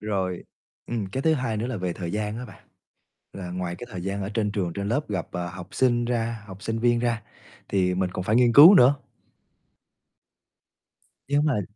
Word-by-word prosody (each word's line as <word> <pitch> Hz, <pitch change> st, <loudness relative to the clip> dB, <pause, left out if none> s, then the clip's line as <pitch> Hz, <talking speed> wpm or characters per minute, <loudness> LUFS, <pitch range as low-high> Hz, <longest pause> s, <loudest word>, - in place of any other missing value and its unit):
Rồi. 95 Hz, -4 st, -3 dB, 0.4 s
Ừm, 115 Hz, -4 st, -3 dB
cái 115 Hz, +8 st, -4 dB
thứ 160 Hz, +1 st, +3 dB
hai 125 Hz, -6 st, -2 dB
nữa 110 Hz, +3 st, -2 dB
là 125 Hz, -3 st, -3 dB
về 90 Hz, -2 st, -2 dB
thời 85 Hz, -1 st, -5 dB
gian 105 Hz, +1 st, -3 dB
á 125 Hz, -, -6 dB
bạn. 110 Hz, -, -15 dB, 0.6 s
Là 90 Hz, -2 st, -7 dB
ngoài 90 Hz, -1 st, -4 dB
cái 120 Hz, -, -8 dB
thời 90 Hz, -3 st, -6 dB
gian 100 Hz, +2 st, -3 dB
ở 95 Hz, -, -3 dB
trên 105 Hz, -2 st, 0 dB
trường 95 Hz, -5 st, -2 dB
trên 100 Hz, +3 st, -4 dB
lớp 120 Hz, +7 st, +1 dB
gặp, 95 Hz, -5 st, -3 dB
ờ, 90 Hz, 0 st, -3 dB
học 90 Hz, 0 st, -9 dB
sinh 120 Hz, -2 st, +2 dB
ra 115 Hz, -2 st, -2 dB
học 95 Hz, +1 st, -11 dB
sinh 115 Hz, 0 st, -2 dB
viên 120 Hz, 0 st, +2 dB
ra 115 Hz, -2 st, -1 dB, 0.5 s
thì 90 Hz, -2 st, +1 dB
mình 90 Hz, 0 st, -1 dB
còn 90 Hz, -, -3 dB
phải 110 Hz, +3 st, +2 dB
nghiên 120 Hz, -1 st, +4 dB
cứu 160 Hz, +10 st, +10 dB
nữa. 135 Hz, -4 st, +6 dB, 2.3 s
Nếu 145 Hz, +1 st, +2 dB
mà 150 Hz, -8 st, +1 dB
105 Hz, 205 wpm, -25 LUFS, 95-120 Hz, 2.3 s, cứu